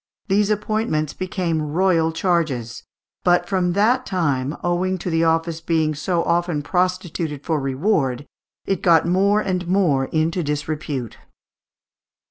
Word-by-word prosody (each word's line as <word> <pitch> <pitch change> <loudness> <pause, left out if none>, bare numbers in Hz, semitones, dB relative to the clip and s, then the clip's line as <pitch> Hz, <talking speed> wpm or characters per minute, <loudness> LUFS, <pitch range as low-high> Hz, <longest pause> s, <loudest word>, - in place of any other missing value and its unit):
these 200 +1 +2
appointments 210 -7 -1
became 180 -4 -2
royal 165 +1 +1
charges; 155 -10 -1 0.4
but 175 0 +3
from 180 -3 0
that 230 +7 +3
time, 145 - -1
owing 180 +2 0
to 180 0 -4
the 165 0 +2
office 165 0 0
being 160 -2 +1
so 170 +3 -1
often 170 -3 0
prostituted 175 -4 -1
for 160 -3 0
reward, 135 - 0 0.4
it 195 -3 -1
got 170 -3 +4
more 200 +4 +3
and 180 -3 -2
more 170 -8 +2
into 160 +4 0
disrepute. 145 -4 -4
170 Hz, 125 wpm, -21 LUFS, 155-185 Hz, 0.4 s, got